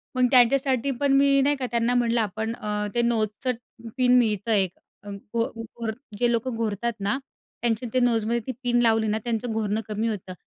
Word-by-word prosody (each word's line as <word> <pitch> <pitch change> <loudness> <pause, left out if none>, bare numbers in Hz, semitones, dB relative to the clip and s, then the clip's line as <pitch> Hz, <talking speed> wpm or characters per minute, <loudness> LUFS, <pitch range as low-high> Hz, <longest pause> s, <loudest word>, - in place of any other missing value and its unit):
मग 255 -1 +4
त्यांच्यासाठी 260 +1 +4
पण 280 -1 +2
मी 275 0 +4
नाही 290 +2 +2
का 265 -2 -3
त्यांना 235 +1 +1
म्हटलं 235 -1 +2
आपण 220 +2 -3
अ, 210 -1 -3
ते 240 - +3
नोजचं 230 +1 0 0.5
पिन 250 -1 +4
मिळतं 220 -1 0
एक, 195 -4 +2 0.3
अ, 205 - -9
घ - - -5 0.5
घोर 225 0 -5 0.3
जे 240 -1 +3
लोकं 235 +1 -1
घोरतात 225 +1 -2
ना 200 +5 0 0.4
त्यांचे 235 0 0
ते 255 - +3
नोजमध्ये 235 -1 +1
ती - - -1
पिन 240 0 +2
लावली 225 -2 +3
ना 215 +1 +1
त्यांचं 235 0 -2
घोरणं 220 -1 -1
कमी 215 +1 -2
होतं. 195 -4 -4
230 Hz, 190 wpm, -25 LUFS, 215-245 Hz, 0.5 s, मग